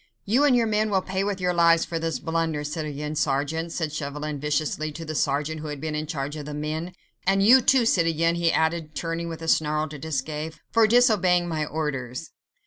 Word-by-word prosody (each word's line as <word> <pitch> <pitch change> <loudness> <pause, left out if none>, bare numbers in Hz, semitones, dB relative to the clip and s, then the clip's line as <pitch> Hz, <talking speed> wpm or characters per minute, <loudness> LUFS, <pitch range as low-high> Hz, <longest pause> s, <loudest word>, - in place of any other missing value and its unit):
"You 240 +8 +3
and 275 -3 +5
your 235 -1 +3
men 215 0 +1
will 190 -2 +1
pay 190 +1 -2
with 200 -1 -2
your 180 -1 0
lives 170 -1 +4
for 165 - -3
this 165 0 -2
blunder, 160 -2 -2
citoyen 150 0 -4
sergeant," 150 +4 -1
said 160 -3 -3
Chauvelin 150 0 -4
viciously 150 +1 -1
to 165 +2 -7
the 155 - -4
sergeant 145 +2 -1
who 155 - -6
had 150 -1 -5
been 155 +1 -4
in 155 0 -3
charge 145 -1 -4
of 150 -2 -7
the 150 - -5
men; 155 +4 -4 0.3
"and 195 +1 +3
you, 255 +4 +8
too, 255 -1 +4
citoyen," 165 -4 +2
he 170 -1 +1
added, 160 -1 0
turning 165 +2 -3
with 165 0 -7
a - - -5
snarl 155 -1 +1
to 150 -1 -8
Desgas, 155 +1 -4 0.2
"for 230 -1 +5
disobeying 210 -7 +4
my 155 -2 -1
orders." 135 -5 -4
160 Hz, 210 wpm, -25 LUFS, 150-175 Hz, 0.3 s, you